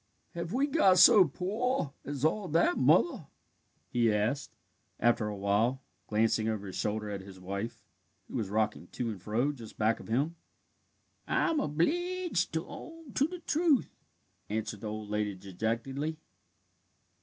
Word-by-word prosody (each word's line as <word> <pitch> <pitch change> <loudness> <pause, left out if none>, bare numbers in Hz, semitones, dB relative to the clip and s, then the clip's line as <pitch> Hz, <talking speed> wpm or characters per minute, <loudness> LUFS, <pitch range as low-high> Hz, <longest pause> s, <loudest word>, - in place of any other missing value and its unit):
"Have 170 0 -4
we 265 +5 +2
got 270 - +4
so 190 +1 +9
pore 195 - -1
as 145 0 -3
all 190 +5 +1
that, 165 +2 +3
Mother?" 155 +2 +3 0.6
he 115 -2 +2
asked, 110 +7 -1 0.4
after 115 -1 +3
a 105 -1 -4
while, 110 +7 +1 0.2
glancing 110 0 +2
over 105 -2 -3
his 95 - -7
shoulder 105 0 -2
at 100 -1 -4
his 95 -1 -12
wife, 100 +5 -5 0.4
who - - -13
was 105 -4 -2
rocking 105 -4 0
to 115 +3 -3
and 100 -4 -8
fro 115 +9 0
just 115 -6 -11
back 110 +1 +2
of - - -11
him. 145 +9 0 0.9
"I'm 330 -3 +2
obleeged 340 - 0
to 160 0 -1
own 330 -5 -10
to 280 - +2
the 360 +1 -8
truth," 315 -4 +2 0.6
answered 105 -1 -3
the 110 - -4
old 105 -1 -6
lady 105 -1 -1
dejectedly. 115 - -3
125 Hz, 150 wpm, -31 LUFS, -, 0.9 s, so